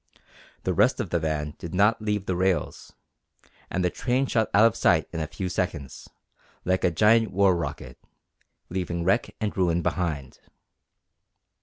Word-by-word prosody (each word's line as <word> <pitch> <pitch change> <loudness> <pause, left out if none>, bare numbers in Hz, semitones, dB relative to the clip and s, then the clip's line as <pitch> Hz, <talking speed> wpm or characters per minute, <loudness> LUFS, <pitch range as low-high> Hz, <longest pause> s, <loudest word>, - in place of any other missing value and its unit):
The - - 0
rest - - +3
of - - -3
the 85 - +1
van 75 -1 -2
did 85 +1 -6
not 105 +4 +3
leave 105 -2 -1
the 95 - -1
rails, 95 0 -1 0.8
and 90 0 -1
the 90 - +1
train 130 +2 0
shot 110 -4 0
out 105 +3 +6
of 115 - +3
sight - - +3
in 80 - -3
a 80 - -2
few 85 +4 -5
seconds, 70 -5 -4 0.6
like 95 0 +1
a - - +4
giant 110 +6 +4
war 95 -1 +3
rocket, 75 -7 -5 0.7
leaving 85 -2 -3
wreck 95 +7 +1
and 105 -2 -2
ruin 85 -2 +1
behind! 75 -8 -3
90 Hz, 160 wpm, -26 LUFS, 85-105 Hz, 0.8 s, out